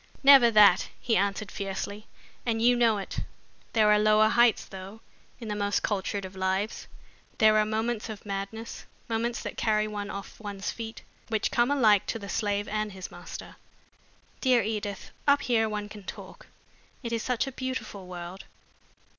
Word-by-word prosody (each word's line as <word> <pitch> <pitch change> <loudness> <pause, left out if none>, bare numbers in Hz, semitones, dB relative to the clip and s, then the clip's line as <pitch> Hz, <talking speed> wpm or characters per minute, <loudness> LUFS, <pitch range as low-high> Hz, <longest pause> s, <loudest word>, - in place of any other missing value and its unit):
"Never 270 -3 +9
that," 210 -4 +6
he 230 - 0
answered 200 +1 0
fiercely, 200 +2 -5 0.4
"and 230 -2 0
you 245 +2 +5
know 230 -3 +3
it. 195 - -4 0.5
There 215 -2 +5
are 210 - +5
lower 215 0 +5
heights, 235 -1 +4
though, 195 +3 -10 0.4
in 230 - -7
the 210 - -2
most 205 0 0
cultured 200 -1 -2
of 190 0 -10
lives. 190 +3 -2 0.5
There 215 -2 +5
are 210 - +2
moments 220 +1 -2
of 215 -1 -8
madness, 200 +3 -5 0.2
moments 235 +1 -2
that - - -6
carry 215 -1 +1
one 205 -1 -5
off 200 -1 -8
one's 205 -2 -4
feet, 225 -1 -7 0.2
which 220 -2 0
come 240 +1 +3
alike 215 -8 +4
to - - -2
the 200 -3 -8
slave 205 0 -1
and 215 -1 -2
his 190 -1 -8
master. - - -9 0.8
Dear 250 -4 +3
Edith, 205 -2 -4 0.2
up 285 0 +4
here 225 -3 +2
one 210 -1 -3
can 210 0 -10
talk. - - -10 0.6
It 235 -1 -3
is 230 - 0
such 250 +1 0
a 270 - -5
beautiful 250 -7 -5
world. 180 +1 -8
215 Hz, 170 wpm, -28 LUFS, 200-230 Hz, 0.8 s, Never